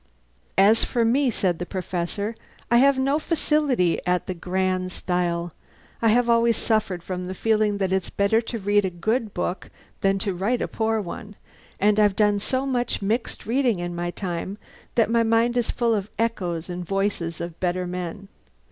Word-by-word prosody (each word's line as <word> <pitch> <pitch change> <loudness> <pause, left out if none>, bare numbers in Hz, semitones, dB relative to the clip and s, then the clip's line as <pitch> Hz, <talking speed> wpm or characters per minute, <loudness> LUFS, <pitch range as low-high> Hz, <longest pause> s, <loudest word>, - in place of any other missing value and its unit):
"As 210 +4 +6
for 235 -2 +1
me," 260 +4 +3
said 185 -6 0
the 175 - -3
Professor, 190 +3 -3 0.4
"I 235 - +6
have 275 +2 +5
no 275 +3 +2
facility 300 - +1
at 180 0 +1
the 185 - -3
grand 185 +1 -1
style. 175 -2 -1 0.5
I 230 - +3
have 235 +2 +4
always 230 -1 +3
suffered 215 -6 0
from 180 0 -4
the 185 - -5
feeling 215 -1 +1
that 190 -1 0
it's 190 -1 0
better 200 +3 +2
to 230 0 -5
read 205 0 +2
a 190 - 0
good 220 +6 -1
book 180 +1 -3 0.3
than 195 0 +2
to 195 0 -2
write 205 +7 0
a - - -2
poor 220 0 0
one; 205 +3 -8 0.4
and 210 +1 +3
I've 205 -2 +4
done 205 -1 +3
so 260 +6 -1
much 245 -5 -1
mixed 225 +5 -2
reading 245 -2 +2
in 175 0 -4
my 175 0 -2
time 180 +2 -4 0.4
that 230 -1 +3
my 235 0 +4
mind 230 +1 +2
is 245 -2 0
full 235 -1 +1
of 205 -1 -2
echoes 180 -7 -1
and 180 0 -5
voices 185 -3 -1
of 170 -1 -6
better 180 0 0
men. 180 +2 -5
205 Hz, 185 wpm, -24 LUFS, 180-230 Hz, 0.5 s, As